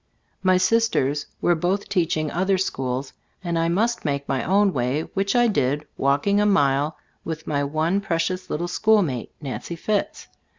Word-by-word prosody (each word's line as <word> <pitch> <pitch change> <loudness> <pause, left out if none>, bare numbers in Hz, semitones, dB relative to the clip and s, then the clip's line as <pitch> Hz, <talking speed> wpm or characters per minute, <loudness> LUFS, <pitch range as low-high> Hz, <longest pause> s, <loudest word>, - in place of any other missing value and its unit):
My 185 -1 +4
sisters 185 -9 +1
were 175 - +3
both 180 +5 -1
teaching 165 -5 0
other 190 +2 +1
schools, 130 -7 -2 0.3
and 170 -2 -1
I 165 0 +1
must 225 +7 0
make 140 -2 -2
my 135 -1 -1
own 195 +1 +3
way, 130 +4 0
which 195 +2 0
I 240 0 +5
did, 145 - 0
walking 145 +10 +2
a - - +3
mile 145 -5 +2 0.3
with 160 -1 -5
my 145 -1 0
one 155 +7 0
pre 185 -5 -1
cious 185 +2 -2
little 170 +3 -2
schoolmate, 180 - +1
Nancy 145 +4 -5
Fitts. 205 +4 -2
170 Hz, 165 wpm, -23 LUFS, 145-195 Hz, 0.3 s, I